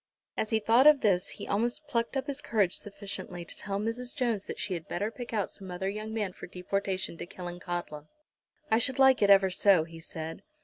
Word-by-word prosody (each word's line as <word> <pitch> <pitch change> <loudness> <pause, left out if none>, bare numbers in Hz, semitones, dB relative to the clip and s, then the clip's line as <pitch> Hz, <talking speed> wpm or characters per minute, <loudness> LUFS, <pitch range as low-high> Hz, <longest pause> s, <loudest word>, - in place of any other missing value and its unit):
As 215 - -1
he 220 - +3
thought 230 +6 +5
of 300 -2 +7
this 185 -4 +2
he - - -7
almost 240 +8 0
plucked 235 -1 -1
up 270 - -1
his 285 0 -3
courage 205 -6 +1
sufficiently 195 -3 -7
to - - -6
tell 195 -1 -3
Mrs. 235 +3 -3
Jones 235 -7 0
that - - -6
she 210 -3 -3
had 165 -2 -5
better 205 +5 -2
pick 245 +1 -8
out 210 -4 -1
some 190 -1 -9
other 180 +2 -3
young 215 +2 -5
man 210 -4 -2
for - - -9
deportation 185 0 -2
to - - -6
Killancodlem. 175 -4 -6 0.6
"I 220 - +5
should 260 +2 +2
like 265 -1 +6
it 200 - +4
ever 195 -1 +6
so," 185 -2 +5
he 165 0 -11
said. 160 0 -6
200 Hz, 215 wpm, -29 LUFS, 180-230 Hz, 0.6 s, of